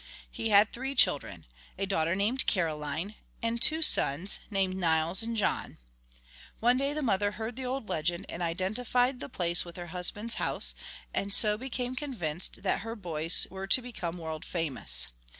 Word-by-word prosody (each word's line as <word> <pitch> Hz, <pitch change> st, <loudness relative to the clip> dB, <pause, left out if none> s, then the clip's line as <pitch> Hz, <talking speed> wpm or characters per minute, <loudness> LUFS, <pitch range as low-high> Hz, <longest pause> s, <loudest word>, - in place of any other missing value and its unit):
He 225 Hz, -, -3 dB
had 210 Hz, +1 st, +5 dB
three 265 Hz, +3 st, -4 dB
children, 85 Hz, -, +2 dB, 0.3 s
a 195 Hz, -, -1 dB
daughter 170 Hz, -3 st, 0 dB
named 215 Hz, +7 st, 0 dB
Caroline, 160 Hz, +1 st, -1 dB, 0.3 s
and 230 Hz, 0 st, -1 dB
two 320 Hz, +1 st, +3 dB
sons, 170 Hz, -, +3 dB
named 195 Hz, -3 st, 0 dB
Nils 165 Hz, -1 st, +2 dB
and 230 Hz, 0 st, -2 dB
John. 210 Hz, -, -1 dB, 0.8 s
One 240 Hz, +2 st, +4 dB
day 275 Hz, +2 st, 0 dB
the 305 Hz, 0 st, -3 dB
mother 205 Hz, -3 st, +1 dB
heard 220 Hz, +2 st, -5 dB
the 260 Hz, 0 st, -5 dB
old 255 Hz, -3 st, -3 dB
legend 170 Hz, +2 st, -2 dB
and 170 Hz, -, -7 dB
identified 235 Hz, +9 st, 0 dB
the -, -, -7 dB
place 175 Hz, -6 st, 0 dB
with 170 Hz, -1 st, -11 dB
her 175 Hz, -2 st, -7 dB
husband's 205 Hz, +6 st, 0 dB
house, -, -, +4 dB, 0.4 s
and 200 Hz, -, -2 dB
so 210 Hz, +1 st, +6 dB
became 250 Hz, +1 st, -4 dB
convinced 190 Hz, -, -3 dB
that -, -, +1 dB
her 225 Hz, 0 st, -6 dB
boys 165 Hz, -5 st, +3 dB
were 190 Hz, 0 st, -6 dB
to 200 Hz, -, +6 dB
become 195 Hz, -9 st, -6 dB
world 160 Hz, -2 st, -6 dB
famous. 130 Hz, -, +1 dB
195 Hz, 170 wpm, -29 LUFS, 170-235 Hz, 0.8 s, so